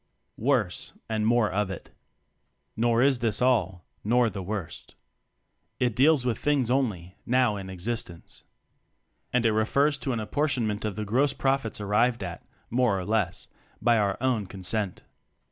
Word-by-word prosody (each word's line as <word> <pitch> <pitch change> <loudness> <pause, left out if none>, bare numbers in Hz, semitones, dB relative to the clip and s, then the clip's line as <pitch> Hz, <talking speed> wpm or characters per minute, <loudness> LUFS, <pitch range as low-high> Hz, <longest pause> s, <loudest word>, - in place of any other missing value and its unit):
Worse 115 -7 0
and 110 -1 0
More 115 -4 +3
of 105 +1 0
It. 95 - -8 0.8
Nor 120 +1 +2
is 135 -2 +3
this 115 -3 0
all, 100 -9 +1 0.2
nor 120 +1 +3
the 100 0 -5
worst. 95 -2 -6 0.8
It 125 -3 +1
deals 140 0 +4
with 120 -4 0
things 140 -5 +1
only, 100 -9 -1
now 125 -3 +2
in 95 -1 -6
existence. 95 -2 -5 0.9
And 125 -1 +1
it 110 - +4
refers 140 +7 +2
to 130 +3 -2
an 120 - -1
appor 145 +8 0
tionment 110 -3 -1
of 105 -3 -2
the 110 0 -3
gross 130 +7 +2
"profits" 135 -5 -1
ar 105 - -4
nved 115 +3 +2
at 90 -2 -6 0.3
(more 120 -4 +2
or 90 - -4
less) 105 -4 -1 0.3
by 115 +1 +3
our 100 -2 +1
own 120 -6 0
consent. 95 +1 -3
110 Hz, 160 wpm, -27 LUFS, 100-125 Hz, 0.9 s, deals